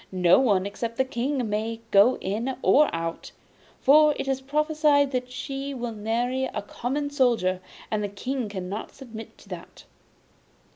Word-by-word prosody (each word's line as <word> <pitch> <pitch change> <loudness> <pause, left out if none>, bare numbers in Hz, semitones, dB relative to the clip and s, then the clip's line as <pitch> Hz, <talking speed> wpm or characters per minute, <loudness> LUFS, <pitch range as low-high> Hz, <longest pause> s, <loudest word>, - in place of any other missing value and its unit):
No 180 -1 +5
one 200 -8 +2
except 230 +3 -4
the 265 - +2
King 260 0 -2
may 220 +2 -2
go 205 +6 +6
in 230 +7 -2
or 300 +1 +5
out, 165 0 -4 0.5
for 300 +2 +6
it - - -4
is 270 -1 -1
prophesied 300 0 +2
that 250 -1 -3
she 275 +1 -5
will 240 -2 -4
marry 235 +5 -1
a 245 - -4
common 285 +7 -3
soldier, 235 -10 +2 0.3
and 215 -1 0
the 205 - -2
King 245 +3 -3
cannot 195 +1 -5
submit 225 -4 -10
to - - -18
that. - - -9
245 Hz, 155 wpm, -25 LUFS, 210-270 Hz, 0.5 s, go